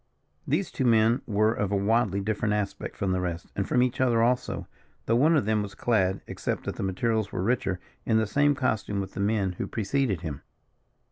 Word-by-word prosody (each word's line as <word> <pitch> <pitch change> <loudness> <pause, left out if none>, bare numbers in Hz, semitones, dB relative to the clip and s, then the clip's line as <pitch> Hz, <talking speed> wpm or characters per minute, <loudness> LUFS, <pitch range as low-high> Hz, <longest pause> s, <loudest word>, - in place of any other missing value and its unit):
These - - 0
two - - -2
men 115 0 +4
were 110 +1 +2
of 105 -3 -2
a - - +2
widely 100 0 +1
different 105 +1 0
aspect 105 -2 -4
from 95 -2 -1
the 95 0 0
rest, 85 -2 -4
and 100 - -1
from 125 - +4
each 125 0 -1
other 120 -3 +3
also, 125 +1 0 0.4
though 115 - +2
one 155 +6 +4
of 130 - +1
them 110 0 +1
was 105 -1 -6
clad, 95 -5 +1
except - - -3
that - - -5
the - - -4
materials 105 +2 0
were 90 - -2
richer, 100 -5 0 0.2
in 110 - +2
the 110 - +2
same 145 +7 +2
costume 110 -6 -1
with 95 -1 -5
the - - -6
men 100 -2 +1
who - - -2
preceded 110 - -1
him. 75 -5 -5
110 Hz, 210 wpm, -27 LUFS, 100-120 Hz, 0.4 s, men